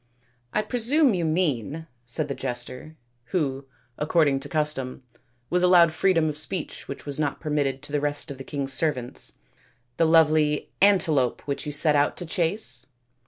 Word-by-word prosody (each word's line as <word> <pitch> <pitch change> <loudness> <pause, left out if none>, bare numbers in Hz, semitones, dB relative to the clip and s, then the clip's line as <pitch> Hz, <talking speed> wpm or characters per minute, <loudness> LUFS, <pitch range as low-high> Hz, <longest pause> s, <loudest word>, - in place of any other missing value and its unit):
" 125 0 -41
I 215 - +2
presume 255 +3 +2
you 175 -3 0
mean," 155 - -1 0.2
said 145 +5 -2
the 140 - -3
jester, 125 +4 -6 0.3
who, 140 -4 -2 0.3
according 150 -2 +2
to 145 +1 -8
custom, 135 -4 -2 0.5
was 180 +1 +2
allowed 180 -2 +6
freedom 165 -1 +2
of 150 -1 -3
speech 175 +1 -3
which 140 - -7
was 145 0 -4
not 145 -2 -1
permitted 145 -3 -1
to 145 - -7
the 145 - +1
rest 145 +1 -1
of 135 - -8
the - - -6
king's 140 -1 -3
servants, 130 -5 -2 0.3
" 120 +1 -38
the 165 - +4
lovely 155 -2 +3
antelope 170 -10 +3
which 140 +1 -3
you - - -2
set 150 +1 +3
out 145 0 +2
to 175 - -4
chase 175 +5 0
150 Hz, 170 wpm, -25 LUFS, 135-165 Hz, 0.5 s, allowed